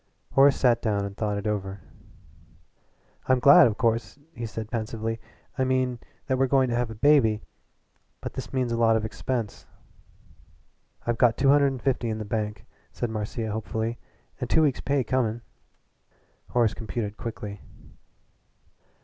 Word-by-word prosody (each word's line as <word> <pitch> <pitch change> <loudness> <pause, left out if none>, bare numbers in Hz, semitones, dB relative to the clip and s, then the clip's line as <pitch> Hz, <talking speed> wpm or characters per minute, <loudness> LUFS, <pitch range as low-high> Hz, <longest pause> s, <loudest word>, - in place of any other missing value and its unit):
Horace 135 +1 +6
sat 120 -3 +3
down 100 -3 0
and 100 0 -7
thought 105 -1 -1
it 100 - -5
over. 100 -2 -2 1.5
"I'm 130 - +4
glad 140 +5 +8
of 105 -3 -2
course," 115 +1 0 0.2
he 115 -1 -5
said 110 0 -6
pensively 115 -1 -3 0.4
"I - - +3
mean 130 -1 +1
glad - - -30 0.3
that 130 -2 0
we're 135 - +3
going 130 -1 +3
to - - 0
have 120 -1 0
a 110 - -7
baby. 110 -4 +4 0.8
But - - -6
this - - -6
means 130 -2 -1
a 115 - -1
lot 115 -1 +4
of 110 -1 0
expense." 115 0 -4 1.4
"I've 120 -1 -1
got 120 -3 +4
two 135 0 +3
hundred 140 0 +5
and 135 -3 -4
fifty 130 -3 0
in 110 - -2
the 110 - -5
bank," 105 -1 -3 0.3
said 120 - -3
Marcia 110 +1 -3
hopefully, 110 +2 -3 0.4
"and - - -4
two 160 - +4
weeks' 140 -4 +1
pay 140 -1 +1
coming." 120 -1 0 1.1
Horace 120 -3 +2
computed 110 -2 -4
quickly. 105 -4 -6
115 Hz, 160 wpm, -26 LUFS, 110-130 Hz, 1.5 s, glad